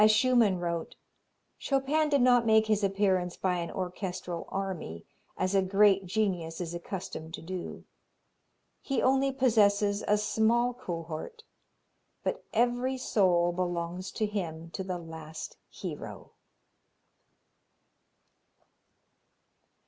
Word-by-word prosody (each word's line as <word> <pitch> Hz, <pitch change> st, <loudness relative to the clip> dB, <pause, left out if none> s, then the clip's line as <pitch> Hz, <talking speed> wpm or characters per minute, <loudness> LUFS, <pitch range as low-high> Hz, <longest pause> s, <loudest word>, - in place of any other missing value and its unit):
As 215 Hz, -, +7 dB
Schumann 225 Hz, -3 st, +4 dB
wrote: 170 Hz, -1 st, -3 dB, 0.6 s
"Chopin 285 Hz, +3 st, +1 dB
did 285 Hz, -2 st, +3 dB
not 245 Hz, -1 st, +5 dB
make 220 Hz, -1 st, +5 dB
his 215 Hz, -1 st, +1 dB
appearance 190 Hz, -3 st, +1 dB
by 185 Hz, -1 st, 0 dB
an 170 Hz, -1 st, -3 dB
orchestral 180 Hz, -2 st, -4 dB
army, 185 Hz, -, -4 dB, 0.3 s
as 185 Hz, +1 st, 0 dB
a 195 Hz, -, +4 dB
great 195 Hz, 0 st, +4 dB
genius 180 Hz, -5 st, -1 dB
is 175 Hz, -2 st, -4 dB
accustomed 170 Hz, -2 st, -6 dB
to -, -, -11 dB
do; 180 Hz, +1 st, -6 dB, 1.0 s
he 275 Hz, -4 st, -1 dB
only 270 Hz, +1 st, +3 dB
possesses 210 Hz, -5 st, +3 dB
a 210 Hz, -, +4 dB
small 230 Hz, +3 st, +2 dB
cohort, 175 Hz, -, -6 dB, 0.8 s
but -, -, -2 dB
every 245 Hz, +3 st, +1 dB
soul 180 Hz, -8 st, +3 dB
belongs 175 Hz, +1 st, -3 dB
to 220 Hz, -, 0 dB
him 165 Hz, -6 st, -4 dB
to 190 Hz, -, -4 dB
the 185 Hz, -1 st, -3 dB
last 160 Hz, -2 st, -8 dB
hero." -, -, -7 dB
195 Hz, 110 wpm, -29 LUFS, 175-225 Hz, 1.0 s, As